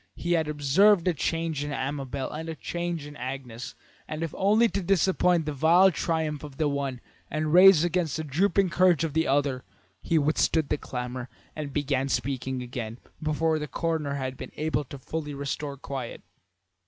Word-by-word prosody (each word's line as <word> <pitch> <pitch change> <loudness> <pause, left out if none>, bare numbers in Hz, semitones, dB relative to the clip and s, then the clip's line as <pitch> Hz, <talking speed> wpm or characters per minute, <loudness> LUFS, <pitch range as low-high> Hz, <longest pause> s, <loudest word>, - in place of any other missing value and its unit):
He 175 - -3
had 160 -3 +2
observed 165 +6 +4
a 180 - +3
change 165 -1 -1
in 145 - -4
Amabel 135 -1 -3
and 160 +2 -5
a 160 - -4
change 170 0 -4
in 145 0 -10
Agnes, 125 -3 -6 0.3
and 155 +1 -4
if 165 - -4
only 215 +4 +4
to 200 - -2
disappoint 180 -2 +2
the 150 - -2
vile 170 +7 +5
triumph 160 -3 -1
of 145 -3 -9
the 155 - +1
one 140 -3 -2 0.3
and 155 +1 -1
raise 185 -2 +8
again 175 0 +1
the 160 - -2
drooping 180 +5 +1
courage 175 -2 +4
of 160 -3 -2
the 160 +1 +1
other, 135 -2 +1 0.4
he 165 - +1
withstood 155 0 +2
the 150 - +1
clamour 125 0 -5 0.3
and 150 -2 -5
began 135 -2 0
speaking 130 0 -2
again, 120 -2 -5 0.2
before 155 +1 +1
the 150 - -4
coroner 155 -1 -2
had 130 -1 -4
been - - -8
able 155 -1 -1
to 140 - -9
fully 150 +2 -5
restore 140 0 -4
quiet. 135 -3 -6
150 Hz, 180 wpm, -27 LUFS, 135-165 Hz, 0.4 s, raise